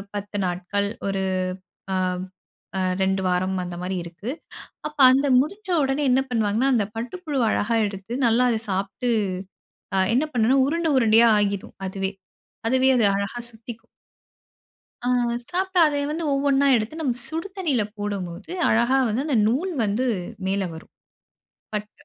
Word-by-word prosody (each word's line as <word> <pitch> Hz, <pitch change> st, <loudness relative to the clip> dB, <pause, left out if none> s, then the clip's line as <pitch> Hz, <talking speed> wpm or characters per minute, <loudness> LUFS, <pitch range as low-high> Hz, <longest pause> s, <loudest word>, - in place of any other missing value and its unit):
10 205 Hz, 0 st, -4 dB
நாட்கள். 190 Hz, +3 st, -2 dB, 0.2 s
ஒரு 195 Hz, -1 st, -1 dB, 0.7 s
ஆம் 185 Hz, -1 st, 0 dB, 0.6 s
அ -, -, 0 dB, 0.2 s
2 190 Hz, 0 st, +1 dB
வாரம் 185 Hz, +1 st, 0 dB
அந்த 175 Hz, -1 st, -6 dB
மாதிரி 185 Hz, +1 st, -2 dB
இருக்கு. 170 Hz, +7 st, -8 dB, 0.6 s
அப்போ 300 Hz, -1 st, -3 dB
அந்த 275 Hz, +2 st, +3 dB
முடிஞ்ச 390 Hz, +9 st, -3 dB
உடனே 270 Hz, +2 st, 0 dB
என்ன 260 Hz, +1 st, +4 dB
பண்ணுவாங்கன்னா, 225 Hz, +2 st, +1 dB
அந்த 220 Hz, -5 st, +2 dB
பட்டு 235 Hz, +6 st, -4 dB
புழுவ 285 Hz, -7 st, 0 dB
அழகா 230 Hz, +3 st, 0 dB
எடுத்து, 195 Hz, +3 st, -7 dB
நல்லா 235 Hz, +2 st, +4 dB
அதை 225 Hz, -, 0 dB
சாப்ட்டு, 195 Hz, +6 st, -2 dB, 0.9 s
அ -, -, +2 dB, 0.2 s
என்ன 275 Hz, +5 st, +3 dB
பண்ணும்னா, 245 Hz, +2 st, +3 dB
உருண்ட 330 Hz, +2 st, 0 dB
உருண்டையா 230 Hz, -1 st, +6 dB
ஆகிரும், 200 Hz, -1 st, -2 dB
அதுவே 190 Hz, 0 st, -3 dB, 0.6 s
அதுவே 260 Hz, +2 st, +3 dB
அது 230 Hz, -, +4 dB
அழகா 200 Hz, +4 st, -3 dB
சுத்திக்கும். 230 Hz, 0 st, -11 dB, 1.1 s
ஆ 245 Hz, -, -3 dB, 0.4 s
சாப்பிட்டா 375 Hz, 0 st, 0 dB
அதை 290 Hz, -1 st, -1 dB
வந்து 325 Hz, +2 st, -3 dB
ஒவ்வொன்னா 275 Hz, 0 st, +2 dB
எடுத்து, 230 Hz, +8 st, -2 dB
நம்ம 250 Hz, -5 st, -1 dB
சுடு 325 Hz, +4 st, -4 dB
தண்ணியில 290 Hz, -, +1 dB
போடம்போது, 200 Hz, -, -5 dB, 0.2 s
அழகா 235 Hz, +4 st, +3 dB
வந்து 230 Hz, +6 st, -1 dB
அந்த 285 Hz, -6 st, +1 dB
நூல் 290 Hz, +12 st, 0 dB
வந்து 215 Hz, +5 st, 0 dB, 0.4 s
மேலே 195 Hz, 0 st, 0 dB
வரும். 160 Hz, -, -13 dB, 0.8 s
பட் 210 Hz, 0 st, -3 dB
230 Hz, 145 wpm, -24 LUFS, 200-270 Hz, 1.1 s, உருண்டையா